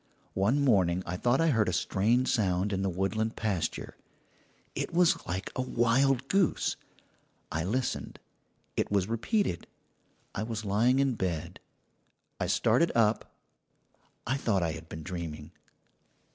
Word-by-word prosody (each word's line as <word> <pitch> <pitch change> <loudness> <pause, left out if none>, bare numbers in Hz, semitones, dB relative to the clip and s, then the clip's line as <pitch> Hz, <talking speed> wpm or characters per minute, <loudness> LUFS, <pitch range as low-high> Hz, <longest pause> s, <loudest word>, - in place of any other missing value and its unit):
"One 110 +9 +2
morning 95 -7 +3
I 90 - -3
thought 120 +7 +2
I 165 0 +3
heard 110 -6 +2
a - - -2
strange 110 +8 +1
sound 100 -2 +1
in 95 - -1
the 95 - 0
woodland 105 +5 -1
pasture. 100 -7 -2 0.8
It - - -3
was 175 0 +2
like 95 +2 -3
a - - 0
wild 130 +2 +2
goose. 195 -4 +1 0.8
I 80 +1 -1
listened; 120 +8 -2 0.6
it - - 0
was 100 -3 +2
repeated. 115 - -1 0.7
I - - -3
was 110 -1 -4
lying 115 +6 +3
in 135 -1 +2
bed. 90 -7 -3 0.8
I - - -1
started 170 0 +3
up 115 -1 +1 0.9
I 130 +3 0
thought 100 -9 +1
I 80 - 0
had 80 0 -9
been 80 0 -7
dreaming. 80 -4 -6
105 Hz, 140 wpm, -29 LUFS, 90-125 Hz, 0.9 s, morning